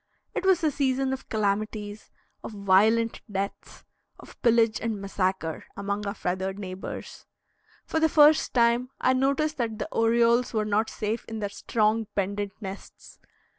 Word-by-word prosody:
It - - -3
was 365 -3 +4
a 310 - +3
season 265 -1 0
of 265 - -7
calamities, 210 0 -2 0.3
of - - -7
violent 210 +3 +3
deaths, 195 0 -5 0.3
of - - -15
pillage 230 -2 +3
and 225 -2 -2
massacre, 190 -4 -2
among 200 +1 -3
our 200 - -3
feathered 190 +1 -2
neighbors. 190 -2 -7 0.6
For 320 - -1
the 320 0 +3
first 300 0 +5
time 235 +1 +3
I 255 - +3
noticed 280 +4 +1
that 230 -4 -2
the - - -3
orioles 235 +1 +3
were 215 -1 +1
not 215 +1 +1
safe 220 +2 -3
in 225 - -6
their 205 -2 -3
strong, 215 +1 0
pendent 200 0 -2
nests. 195 -2 -10
220 Hz, 150 wpm, -26 LUFS, 200-240 Hz, 0.6 s, first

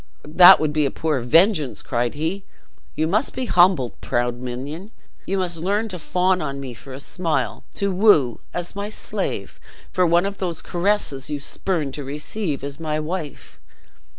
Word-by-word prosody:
"That 175 +4 +8
would 155 -1 0
be 150 -2 +2
a - - -1
poor 155 0 -1
vengeance," 140 - +3
cried 120 +2 -1
he; 165 +6 -2 0.5
"you 155 - +1
must 210 - 0
be 260 - -2
humbled, 175 - +3
proud 120 0 -1
minion, 140 - -6 0.4
you 195 - 0
must 175 -3 -1
learn 205 +6 -1
to 180 -3 -6
fawn 180 +3 +1
on 140 -2 -4
me 135 -3 -6
for 130 +3 -12
a 130 - -7
smile; 145 - -2
to 200 -1 0
woo, 180 - +4
as 175 +1 -4
my 200 +1 -4
slave, - - -3 0.3
for 180 -1 +2
one 170 +2 +3
of 200 0 -4
those 175 -4 -3
caresses 175 -7 -1
you 145 -1 -3
spurned 150 -1 -2
to 145 - -5
receive 150 +3 -3
as 140 +1 -6
my 155 -1 -2
wife." 155 -1 -6
160 Hz, 175 wpm, -22 LUFS, 140-185 Hz, 0.5 s, That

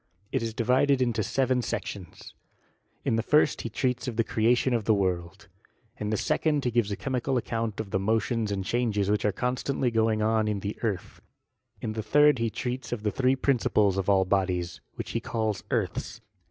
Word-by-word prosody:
It - - 0
is 115 -1 -3
divided 130 +4 +3
into 120 -3 +1
seven 130 +3 +1
sections. 100 -5 -6 0.7
In 115 - +2
the - - +2
first 150 +6 +3
he 115 - -4
treats 125 +2 -1
of 120 - -3
the 115 - +2
creation 120 +4 +2
of 115 -4 0
the 110 - +4
world; 95 +1 -2 0.5
in 105 - -2
the 110 - 0
second 155 +2 +1
he 125 - +1
gives 115 -3 +1
a - - 0
chemical 130 +1 -1
ac 120 - -2
count 115 -2 -2
of 105 -3 -5
the 95 - +1
motions 110 +1 0
and 95 -2 -2
changes 105 -4 0
which 105 - +1
are 105 - +3
constantly 125 +2 -1
going 110 -1 +2
on 110 0 +2
in 105 -2 -1
the 100 +2 -3
earth; 105 -7 -3 0.6
in 110 - -3
the 110 - -3
third 150 +3 +4
he 115 0 +1
treats 125 +3 -4
of 115 -3 -3
tha 105 - +1
three 130 +2 +2
principles 110 -7 +2
of 95 0 -1
all 95 -1 +4
bodies, 90 -2 -1
which - - -5
he - - -1
calls 110 -3 -2
earths. - - -2
110 Hz, 200 wpm, -27 LUFS, 105-125 Hz, 0.7 s, the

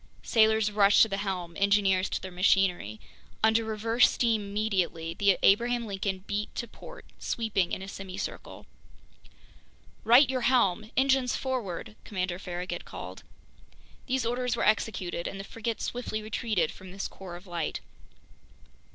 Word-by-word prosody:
Sailors 220 -1 +3
rushed 205 -1 +6
to - - +2
the 195 -2 -3
helm, 185 -4 -4
engineers 200 -2 +3
to - - -2
their 190 - -8
machinery. 180 - +2 0.4
Under 220 +1 +4
reverse 225 +2 +3
steam 230 -3 +1
immediately, 195 -5 -1
the 200 -1 +3
Abraham 235 +4 +3
Lincoln 195 -2 -3
beat 210 +1 -3
to 235 - -3
port, - - -12
sweeping 215 -6 -1
in 190 - -3
a - - -7
semicircle. 195 -1 -7 1.4
"Right 245 +5 +7
your 255 -1 -1
helm! 220 -4 +2
Engines 265 -1 +3
forward!" 220 -7 -4
Commander 185 -3 -3
Farragut 180 -1 -5
called. - - -8 0.9
These 260 -2 0
orders 245 +1 0
were - - 0
executed, 190 -5 0
and 195 - -6
the - - -5
frigate 225 +2 -4
swiftly 230 -3 -3
retreated 215 -5 -1
from 185 -1 -12
this 195 +1 -4
core 185 -3 -10
of 175 +3 -11
light. 175 -3 -3
205 Hz, 145 wpm, -28 LUFS, 185-230 Hz, 1.4 s, Right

